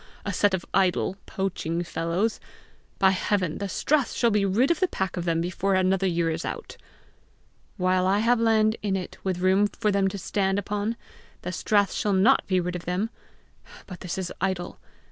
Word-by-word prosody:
A 200 - -2
set 200 +1 +3
of 175 - -6
idle, 190 0 +2
poaching 175 -4 -2
fellows! 170 +6 -1 0.6
By 190 -1 +5
heaven, 185 -3 0
the 200 -1 -3
strath 285 +5 +1
shall 235 -2 +2
be 205 -1 +2
rid 230 - +2
of 340 - +1
the 370 - +3
pack 190 - -3
of 175 -2 -3
them 165 -1 +1
before 185 +3 0
another 185 +1 +2
year 170 -2 +1
is 160 +1 -3
out!" - - -6 1.0
"While 185 -1 +2
I 195 +2 +3
have 230 +3 +3
land 220 -1 +3
in 200 -2 0
it 185 -2 -5
with 185 -2 -1
room 190 +2 +4
for 210 0 -1
them 195 -1 +2
to 195 - -3
stand 195 0 0
upon, 210 +3 -2 0.5
the 180 - -3
strath 205 +1 +1
shall 205 - 0
not 200 +8 +4
be 185 -2 +2
rid 180 0 -3
of 175 - -6
them! 185 +6 -1 0.7
But 180 -4 -9
this 180 - -5
is 185 -2 -3
idle! 185 -2 -2
190 Hz, 190 wpm, -26 LUFS, 180-205 Hz, 1.0 s, By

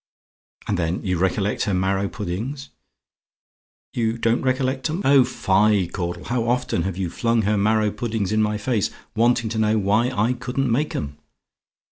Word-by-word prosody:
"And 100 -3 0
then 85 +1 -1
you 90 -3 -1
recollect 95 +2 0
her 100 - 0
marrow 95 +1 0
puddings? 115 +9 -5 1.2
"YOU 115 -1 0
DON'T 115 +1 +1
RECOLLECT 130 +2 0
'EM? 170 +6 -3
"Oh, 135 -1 +6
fie! 100 -2 +2
Caudle, 90 -1 -4
how 120 +1 -1
often 125 -7 0
have 90 +1 -3
you 95 -2 -1
flung 115 +3 +1
her 105 +2 +1
marrow 105 +1 +2
puddings 110 -4 -2
in 110 0 +2
my 105 0 0
face, 110 -1 0 0.3
wanting 120 +1 +2
to 110 - -2
know 110 0 +2
why 105 +4 +2
I 115 0 +1
couldn't 125 +1 -2
make 145 +6 0
'em? 70 0 -5
110 Hz, 165 wpm, -22 LUFS, 95-120 Hz, 1.2 s, Oh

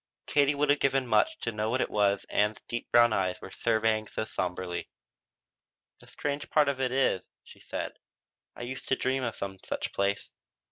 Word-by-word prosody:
Katie 145 0 +3
would 145 0 +3
have 145 - +3
given 135 -1 +2
much 320 - +3
to - - -1
know 105 0 -1
what 125 +3 +1
it - - 0
was 100 -1 +2
Ann's 105 +1 +1
deep 120 - -4
brown 120 -1 +6
eyes 95 -2 0
were - - -9
surveying 110 -1 +1
so 110 - -3
somberly. 90 -3 -3 1.1
"The - - -16
strange 145 0 -3
part 150 -2 +4
of 135 -1 -2
it 130 -1 +1
is," 130 -8 +2 0.2
she - - -15
said, - - -5 0.6
"I - - -7
used 130 +2 -6
to 135 - +3
dream 130 +1 0
of 120 -2 -2
some 95 -1 -5
such - - -3
place." 100 0 0
120 Hz, 190 wpm, -29 LUFS, 105-135 Hz, 1.1 s, brown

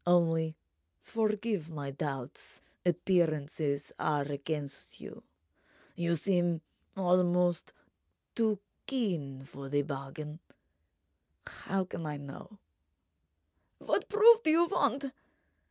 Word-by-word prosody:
Only—forgive 165 - 0
my 145 -3 -4
doubts—appearances 150 +2 -1
are 150 -2 +1
against 140 0 -4
you—you 170 - -6
seem 175 -1 +1 0.4
almost 180 -1 +3 0.6
too 220 -3 +2 0.3
keen 165 - -1
for 135 0 -9
the 145 +1 +2
bargain. 150 +2 -6 1.1
How 195 0 -2
can 170 -3 -5
I 150 -1 -3
know—?" 140 +9 -10 1.2
"What - - -1
proof 445 +2 +8
do 315 - +1
you 330 +2 +6
want?" 280 - +1
160 Hz, 85 wpm, -32 LUFS, 140-190 Hz, 1.2 s, proof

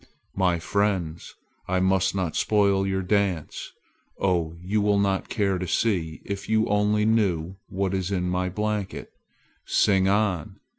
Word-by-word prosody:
"My 90 -2 +2
friends, 90 -3 -1 0.3
I 95 0 +1
must 95 0 +2
not 90 -4 -2
spoil 100 -2 +2
your 95 0 -1
dance. 95 -4 -1 0.5
Oh, 85 -4 0
you 100 +4 -1
would 100 -1 +2
not 95 -1 -1
care 100 -3 0
to 90 - -3
see 85 -6 0
if 100 0 -5
you 110 0 +3
only 105 +1 +2
knew 95 -6 +1
what 95 0 -1
is 95 -1 -1
in 90 -2 -1
my 90 +1 0
blanket. 105 0 -3 0.5
Sing 95 -2 +3
on! 100 -5 0
95 Hz, 145 wpm, -25 LUFS, 90-105 Hz, 0.5 s, you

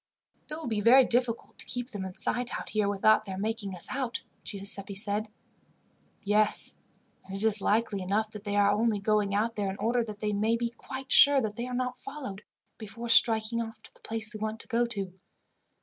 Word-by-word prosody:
"It 305 - -4
will 320 - -7
be 220 -3 -1
very 255 +4 +7
difficult 240 -1 0
to - - -6
keep 245 0 -3
them 200 -4 -4
in 185 -1 -7
sight 245 0 -1
out - - -8
here 210 -2 +1
without 215 +2 +4
their 190 -2 -5
making 210 -1 -3
us 175 - -7
out," 255 -3 -3 0.2
Giuseppi 200 0 -4
said. 205 +2 -1 1.0
"Yes, 210 +1 +2 0.5
and 195 - -8
it 195 - -5
is 215 -2 +2
likely 210 -1 +1
enough 210 +4 0
that 210 -2 -9
they 205 -1 -2
are 205 0 +5
only 215 +1 +2
going 205 0 +1
out 225 +3 0
there 205 -2 -1
in 190 - -5
order 235 +4 +1
that 210 -2 -7
they 210 -1 -1
may 220 +3 +1
be 235 0 -1
quite 260 +2 -8
sure 285 -1 +8
that 210 -3 -3
they 240 +2 -4
are 250 - -4
not 250 0 -2
followed, 260 -9 -7 0.4
before 230 +2 -7
striking 230 0 +4
off 225 -1 -7
to - - -13
the - - -21
place 225 -1 -1
they 215 - -7
want 220 +1 -3
to - - -14
go 240 -1 +1
to. 200 -5 -5
215 Hz, 210 wpm, -29 LUFS, 205-235 Hz, 1.0 s, sure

